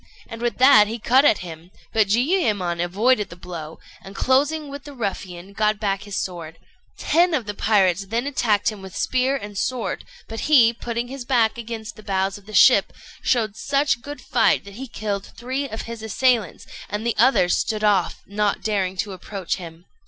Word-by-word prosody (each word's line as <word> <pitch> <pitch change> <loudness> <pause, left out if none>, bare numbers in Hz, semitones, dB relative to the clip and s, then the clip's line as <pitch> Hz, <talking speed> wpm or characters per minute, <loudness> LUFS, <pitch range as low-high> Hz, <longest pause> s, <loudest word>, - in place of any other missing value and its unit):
and 230 0 -9
with 240 -1 -1
that 250 -5 +7
he 225 +2 -4
cut 250 +4 +4
at 290 -8 +5
him; 165 0 -10 0.2
but 220 -2 +3
Jiuyémon 210 - +1
avoided 210 +5 +1
the 170 - -10
blow, 170 -3 -8 0.2
and 195 +1 -12
closing 290 +6 +1
with 280 0 -8
the 290 -1 -11
ruffian, 195 -4 -5
got 215 0 +1
back 200 -1 -2
his 205 -1 -5
sword. 165 -3 -5 0.4
Ten 340 +2 +2
of 255 -7 -2
the 205 - -4
pirates 195 -3 +2
then 230 +5 -1
attacked 225 -7 +1
him 210 -2 -10
with 190 -2 -9
spear 260 +1 +1
and 205 -6 -7
sword; 240 +4 -2 0.2
but 225 0 -6
he, 240 -6 +6
putting 235 +1 -4
his 265 0 -7
back 235 -4 +2
against 230 -1 -7
the - - -11
bows 195 -1 -1
of 200 - -24
the 215 - -10
ship, - - +6 0.3
showed 220 -5 +1
such 280 -1 0
good 290 +3 -8
fight - - +2
that 200 - -11
he 265 +6 -7
killed 205 -4 -4
three 260 +4 -3
of 220 - -5
his 230 -1 -7
assailants, 220 -2 0 0.2
and 210 +2 -4
the 235 - 0
others 230 -7 +4
stood 215 -1 -2
off, 200 -4 +1
not 205 0 -1
daring 190 -3 -1
to 200 +1 -3
approach 190 0 -4
him. 170 -1 -11
215 Hz, 190 wpm, -22 LUFS, 195-250 Hz, 0.4 s, that